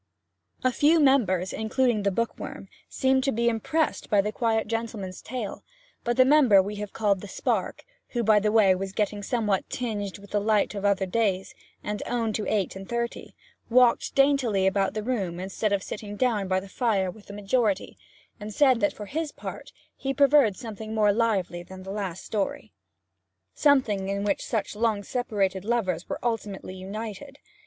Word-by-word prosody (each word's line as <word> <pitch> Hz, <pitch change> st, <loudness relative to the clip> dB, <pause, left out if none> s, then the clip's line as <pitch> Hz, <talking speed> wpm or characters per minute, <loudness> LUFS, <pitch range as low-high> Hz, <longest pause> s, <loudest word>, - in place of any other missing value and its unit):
A 255 Hz, -, +3 dB
few 305 Hz, +6 st, +4 dB
members, 210 Hz, -, +3 dB
including 220 Hz, 0 st, +1 dB
the 200 Hz, -, +2 dB
Bookworm, 230 Hz, +4 st, -4 dB, 0.2 s
seemed 265 Hz, -1 st, +2 dB
to 275 Hz, -, +2 dB
be 235 Hz, 0 st, 0 dB
impressed 300 Hz, +8 st, -1 dB
by 205 Hz, -, +4 dB
the 210 Hz, +2 st, +1 dB
quiet 225 Hz, -1 st, 0 dB
gentleman's 220 Hz, -4 st, -4 dB
tale; 240 Hz, -4 st, -5 dB, 0.4 s
but 240 Hz, +1 st, -1 dB
the 255 Hz, -, +7 dB
member 265 Hz, -8 st, +6 dB
we 205 Hz, +2 st, -1 dB
have 210 Hz, -1 st, -5 dB
called 205 Hz, -4 st, +1 dB
the 205 Hz, -, -8 dB
Spark -, -, -2 dB, 0.2 s
who, 240 Hz, -1 st, -2 dB
by 215 Hz, -1 st, +5 dB
the 210 Hz, +1 st, +1 dB
way, 210 Hz, -4 st, +5 dB
was 190 Hz, +1 st, -4 dB
getting 205 Hz, 0 st, -1 dB
somewhat 210 Hz, -3 st, -1 dB
tinged 210 Hz, -6 st, -3 dB
with 200 Hz, 0 st, -15 dB
the 205 Hz, -, +1 dB
light 215 Hz, 0 st, +2 dB
of 200 Hz, -1 st, -4 dB
other 200 Hz, -1 st, +2 dB
days, 195 Hz, -1 st, 0 dB, 0.3 s
and 210 Hz, 0 st, -3 dB
owned 230 Hz, -3 st, -1 dB
to 210 Hz, -, -2 dB
eight 200 Hz, -4 st, 0 dB
and 190 Hz, 0 st, -9 dB
thirty 235 Hz, 0 st, -4 dB, 0.3 s
walked 245 Hz, 0 st, +4 dB
daintily 275 Hz, -8 st, +3 dB
about 195 Hz, +1 st, +1 dB
the 215 Hz, -, -2 dB
room 195 Hz, -8 st, -2 dB
instead 195 Hz, +3 st, -2 dB
of 200 Hz, -2 st, +1 dB
sitting 205 Hz, -1 st, -6 dB
down 215 Hz, -4 st, +1 dB
by 185 Hz, 0 st, +1 dB
the 195 Hz, -, -10 dB
fire 195 Hz, -3 st, 0 dB
with 210 Hz, +2 st, -16 dB
the 200 Hz, -, -9 dB
majority 205 Hz, 0 st, 0 dB, 0.4 s
and 210 Hz, 0 st, -7 dB
said 260 Hz, -5 st, +4 dB
that 205 Hz, -, +1 dB
for 210 Hz, -, -8 dB
his 305 Hz, +7 st, -3 dB
part -, -, -8 dB, 0.2 s
he 270 Hz, 0 st, -3 dB
preferred 280 Hz, -7 st, +5 dB
something 220 Hz, -2 st, -7 dB
more 210 Hz, -2 st, +4 dB
lively 200 Hz, -6 st, 0 dB
than 185 Hz, +2 st, -11 dB
the 190 Hz, -, -7 dB
last 195 Hz, -4 st, -4 dB
story 205 Hz, -3 st, -3 dB, 0.8 s
something 225 Hz, -10 st, +2 dB
in 200 Hz, 0 st, -1 dB
which 200 Hz, -1 st, 0 dB
such 215 Hz, -2 st, -2 dB
long 215 Hz, -2 st, 0 dB
separated 200 Hz, -6 st, -1 dB
lovers 200 Hz, -7 st, -1 dB
were -, -, -2 dB
ultimately 215 Hz, -5 st, -3 dB
united. 215 Hz, +8 st, -7 dB
210 Hz, 180 wpm, -26 LUFS, 195-235 Hz, 0.8 s, the